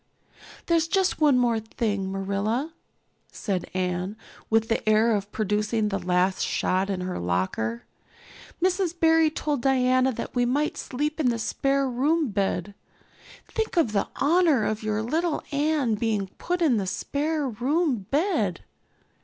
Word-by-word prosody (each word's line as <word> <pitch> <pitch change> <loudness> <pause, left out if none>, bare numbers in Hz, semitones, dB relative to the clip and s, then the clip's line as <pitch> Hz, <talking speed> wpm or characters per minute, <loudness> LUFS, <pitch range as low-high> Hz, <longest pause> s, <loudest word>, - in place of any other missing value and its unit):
"There's 335 -1 +2
just 380 -2 +1
one 290 -4 +5
more 240 -2 +2
thing, 210 -3 -2
Marilla," 200 +10 -2 0.6
said 190 -4 -3
Anne, 185 +2 -2 0.3
with 225 0 +2
the 225 -1 0
air 220 +1 +4
of 200 0 -4
producing 210 +1 0
the 195 -1 -2
last 180 +1 +1
shot 190 +2 0
in 190 -2 -2
her 180 0 -3
locker. 95 +6 -1 0.8
"Mrs. 365 -1 0
Barry 325 -1 +5
told 295 -3 -2
Diana 255 0 +3
that 230 - -6
we 245 - +2
might 285 +5 0
sleep 300 +4 -3
in 275 -5 +3
the 235 - 0
spare 275 +4 0
room 285 +4 +1
bed. 200 -1 -1 0.7
Think 440 -4 -3
of 315 -10 +3
the 200 -2 0
honor 305 -6 +3
of 215 0 -1
your 215 0 -1
little 320 +7 -1
Anne 290 -4 +1
being 210 -3 -1
put 355 0 -1
in 265 -8 +3
the 195 -2 -2
spare 295 +7 -1
room 255 - 0
bed." 285 - 0
235 Hz, 145 wpm, -25 LUFS, 200-300 Hz, 0.8 s, one